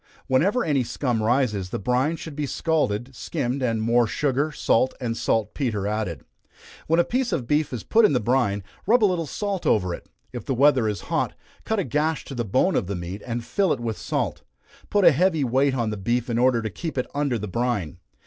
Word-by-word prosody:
Whenever 185 - +2
any 140 -5 +2
scum 120 -1 -1
rises, 110 -5 +1
the - - -3
brine 125 - +1
should 160 -2 -8
be 150 -1 -2
scalded, 130 -6 -1
skimmed, 125 +3 -3
and 115 -3 0
more 120 +1 +3
sugar, 145 +4 0
salt 130 -2 +1
and 120 -3 -2
salt 110 -2 0
petre 110 -8 -2
added. 105 - -3 0.6
When 165 +2 +3
a - - +6
piece 250 +3 -1
of 125 - -1
beef 150 +4 +1
is 125 -4 -5
put 230 +1 +3
in 210 - +5
the 125 - +3
brine, 110 -4 +1 0.2
rub 235 +2 +4
a - - +8
little 175 -5 0
salt 200 +2 -3
over 90 -5 +2
it. - - -9 0.2
If - - -5
the 135 - -2
weather 135 -3 +4
is 105 -5 -2
hot, - - -1 0.3
cut 220 - 0
a 195 - +1
gash 150 +3 -1
to - - -8
the 120 -2 -2
bone 130 - +2
of - - 0
the 100 - -3
meat, 90 +3 -6
and 115 -1 -3
fill 195 -4 +1
it 135 - 0
with 115 -2 -3
salt. - - -2 0.5
Put 205 -2 +3
a 170 - +9
heavy 160 0 +2
weight 130 +2 +2
on 115 -4 -1
the 105 - -4
beef 120 +5 -1
in 115 - 0
order 125 -2 +3
to 110 - -3
keep 160 - -5
it 125 - +1
under 140 -4 0
the 105 0 -5
brine. 100 -6 -2
125 Hz, 225 wpm, -24 LUFS, 110-150 Hz, 0.6 s, a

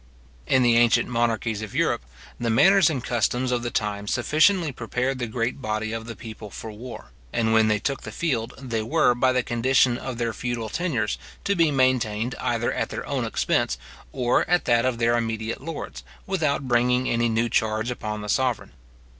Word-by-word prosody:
In 130 -1 +4
the 120 -1 +4
ancient 120 0 +4
monarchies 115 -2 0
of 110 -2 -7
Europe, - - +1 0.4
the 120 -1 -1
manners 180 - +5
and 135 -6 -3
customs 125 +2 0
of 120 -1 0
the 120 - -2
time 105 -2 -2
sufficiently 155 - +3
prepared 125 +2 -2
the 120 - -2
great 115 +4 -2
body 110 -1 -2
of 115 0 -5
the 115 - -6
people 110 -2 -9
for 110 +3 -8
war; 115 - -10 0.2
and 110 -1 +1
when 110 -1 +5
they 105 -1 +2
took 135 +6 -3
the - - -8
field, 125 -8 -2
they 120 -5 -3
were, 115 +2 +3
by 130 +2 +2
the 125 -1 +1
condition 120 +1 +2
of 130 -3 -5
their 115 -1 -1
feudal 120 -2 -3
tenures, 130 - -1 0.2
to 200 - +1
be 165 -3 +4
maintained 125 -4 +1
either 120 0 0
at - - -2
their - - -5
own - - -2
expense, - - 0 0.3
or 125 -2 +2
at 175 0 +2
that 120 0 +3
of 130 -2 0
their 115 0 +2
immediate 115 0 -2
lords, 165 +2 -6 0.2
without 155 -8 -1
bringing 125 +1 +2
any 120 0 +1
new 115 +1 +1
charge 110 0 0
upon 105 -3 -4
the 105 - -6
sovereign. 120 -4 0
120 Hz, 190 wpm, -24 LUFS, 110-130 Hz, 0.4 s, manners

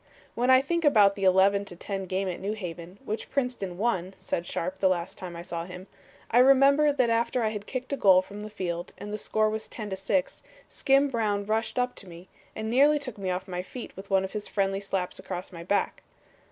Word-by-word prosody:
"When 245 +2 0
I 260 0 +7
think 335 +4 -1
about 215 -9 +6
the 195 -1 -3
11 195 +2 +4
to 175 - -9
10 195 +1 -5
game 190 +2 -1
at 180 - -4
New 205 +2 -2
Haven, 180 -2 -7
which 215 +2 -4
Princeton 245 -10 -2
won," 190 -4 -1
said 170 +1 -3
Sharpe 185 +3 -3
the 190 - +4
last 175 0 -2
time 180 -2 -8
I 170 - -7
saw 170 -1 -5
him, 180 +1 -9 0.5
"I 240 - +5
remember 275 +3 +6
that 255 -5 +2
after 235 +1 +1
I 220 - +2
had 210 -1 -6
kicked 255 +1 -4
a - - -1
goal 190 -5 +6
from 205 +2 -9
the 215 - -6
field 175 -4 -4
and 205 +2 -7
the 215 - -3
score 215 +1 +1
was 220 0 -4
10 210 -3 -6
to - - -1
6, 195 +8 -1 0.3
Skim 275 +1 +2
Brown 210 -5 0
rushed 220 +3 -1
up 250 0 +1
to 195 - -10
me, 175 +2 -12 0.3
and 220 0 -4
nearly 280 +6 +5
took 255 -7 -7
me 190 -1 -2
off 185 +2 -3
my 180 -1 -3
feet 235 +6 -9
with 195 +1 -10
one 190 -1 +3
of 190 - -5
his 210 -1 -4
friendly 195 -1 0
slaps 195 -2 -3
across 180 -1 -6
my 170 -2 -8
back. 200 +4 0
200 Hz, 235 wpm, -27 LUFS, 185-240 Hz, 0.5 s, I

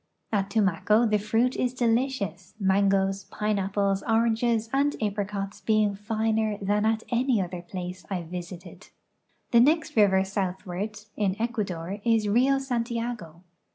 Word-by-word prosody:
At 200 -2 0
Tumaco 205 +2 +2
the 215 -2 +2
fruit 225 +5 +1
is 250 0 -1
delicious, 230 - -1
mangoes, 195 0 +2
pineapples, 200 -1 -1
oranges, 230 0 +1
and 285 +2 +2
a})i'icots 200 -1 -3
being 215 -2 +2
finer 220 +1 -1
than 205 +2 +1
at 220 0 0
any 245 -1 +2
other 180 -1 -3
place 180 0 -7
I 185 -3 -2
visited. 175 +2 -8 0.6
The 235 - +6
next 310 +6 +3
river 195 -3 +5
southward 195 +2 -4
(in 200 -1 -1
Ecuador) 200 -6 -3
is 225 -3 +2
Rio 255 +6 +3
Santiago. 235 - -3
210 Hz, 125 wpm, -26 LUFS, 190-230 Hz, 0.6 s, The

